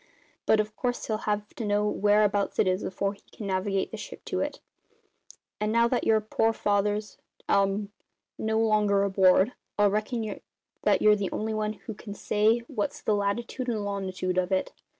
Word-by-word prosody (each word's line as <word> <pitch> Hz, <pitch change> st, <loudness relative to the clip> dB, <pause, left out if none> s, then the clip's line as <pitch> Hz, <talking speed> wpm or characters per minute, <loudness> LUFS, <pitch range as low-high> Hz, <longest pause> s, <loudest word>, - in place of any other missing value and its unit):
But, 220 Hz, -, +5 dB
of 215 Hz, 0 st, -1 dB
course, 245 Hz, 0 st, -2 dB
he'll 215 Hz, -1 st, -1 dB
have 210 Hz, 0 st, -2 dB
to 235 Hz, -, -5 dB
know 205 Hz, 0 st, +1 dB
whereabouts 205 Hz, -1 st, +2 dB
it -, -, +3 dB
is 185 Hz, +1 st, +1 dB
afore 195 Hz, +1 st, -2 dB
he 200 Hz, -, -19 dB
can 215 Hz, -, -8 dB
navigate 195 Hz, 0 st, -1 dB
the -, -, -6 dB
ship -, -, -9 dB
to -, -, -2 dB
it; -, -, -3 dB, 1.0 s
and 210 Hz, 0 st, 0 dB
now 235 Hz, +1 st, +4 dB
that 245 Hz, 0 st, 0 dB
your 220 Hz, -1 st, +4 dB
pore 225 Hz, +1 st, +1 dB
father's 205 Hz, 0 st, 0 dB, 0.3 s
um 200 Hz, +1 st, +1 dB, 0.4 s
no 220 Hz, 0 st, -1 dB
longer 210 Hz, -3 st, +3 dB
aboard, 190 Hz, +2 st, +4 dB, 0.2 s
I 205 Hz, -, +4 dB
reckon 215 Hz, +1 st, -1 dB, 0.4 s
that -, -, +2 dB
you're 210 Hz, 0 st, +7 dB
the 200 Hz, -2 st, -3 dB
only 220 Hz, +1 st, -2 dB
one 215 Hz, 0 st, -1 dB
who 220 Hz, +1 st, -8 dB
can 205 Hz, 0 st, -9 dB
say 220 Hz, +4 st, +2 dB
what's 210 Hz, -3 st, -3 dB
the 215 Hz, -, 0 dB
latitood 220 Hz, +5 st, -2 dB
and 215 Hz, -3 st, -1 dB
longitood 185 Hz, -2 st, -2 dB
of 180 Hz, +1 st, -1 dB
it." 190 Hz, -, 0 dB
210 Hz, 180 wpm, -27 LUFS, 200-220 Hz, 1.0 s, you're